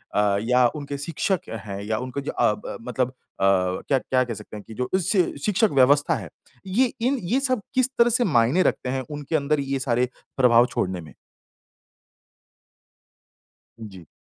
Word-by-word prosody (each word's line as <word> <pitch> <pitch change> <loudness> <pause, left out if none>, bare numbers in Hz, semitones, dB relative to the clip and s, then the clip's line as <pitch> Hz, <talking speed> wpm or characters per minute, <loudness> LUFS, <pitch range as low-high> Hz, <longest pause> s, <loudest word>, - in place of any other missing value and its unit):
अ, 105 -1 +3
या 125 0 +5
उनके 145 -1 -5
शिक्षक 165 +5 -2 0.2
हैं 100 0 -5
या 110 +1 -1
उनके 130 +3 -4
जो 140 - -4
अ, 105 - +2
ब - - -7
मतलब 125 +1 -1
अ, - - -17 0.3
क्या 95 +6 +2
क्या 130 0 +1
कह 120 -2 -4
सकते 110 - -10
हैं 105 - -10
कि 110 - -9
जो 125 +3 -3
इससे 190 +1 +2 0.2
शिक्षक 210 +1 +3
व्यवस्था 145 +4 +4
है, 100 -9 -6 0.4
ये 240 +7 +2
इन 260 +4 +1
ये 230 +10 +1
सब 255 -4 0
किस 255 0 +3
तरह 235 0 +6
से 245 +2 +2
मायने 145 - +3
रखते 125 - 0
हैं 130 +1 -1
उनके 145 +2 -4
अंदर 150 0 +1
ये 135 0 -2
सारे 125 -1 0 0.3
प्रभाव 120 -2 +6
छोड़ने 95 -8 -2
में? 75 - -14 2.7
जी। 95 -7 -10
130 Hz, 175 wpm, -24 LUFS, 115-170 Hz, 2.7 s, तरह